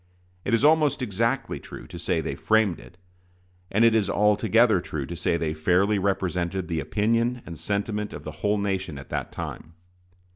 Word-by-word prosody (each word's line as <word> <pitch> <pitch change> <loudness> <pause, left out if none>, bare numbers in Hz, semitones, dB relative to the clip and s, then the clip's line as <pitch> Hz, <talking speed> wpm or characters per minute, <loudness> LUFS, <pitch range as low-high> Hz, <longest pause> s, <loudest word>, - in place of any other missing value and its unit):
It 115 - +2
is 115 - +2
almost 150 -3 +4
exactly 115 +4 -1
true - - -10
to - - -9
say - - 0
they - - -3
framed 110 -5 +2
it, 90 - -15 0.7
and 110 +4 +3
it 115 - +5
is 110 -3 +2
altogether 105 0 +3
true 75 -5 -4
to 85 - -6
say 85 +1 0
they 80 -2 -1
fairly 90 +6 +2
represented 95 -2 -1
the 80 -2 -1
opinion 115 - 0
and 85 - -7
sentiment 105 +3 -2
of - - -8
the - - -6
whole 105 0 +2
nation 95 -6 -2
at 70 - -10
that - - -3
time. 80 +1 -7
100 Hz, 180 wpm, -25 LUFS, 90-115 Hz, 0.7 s, it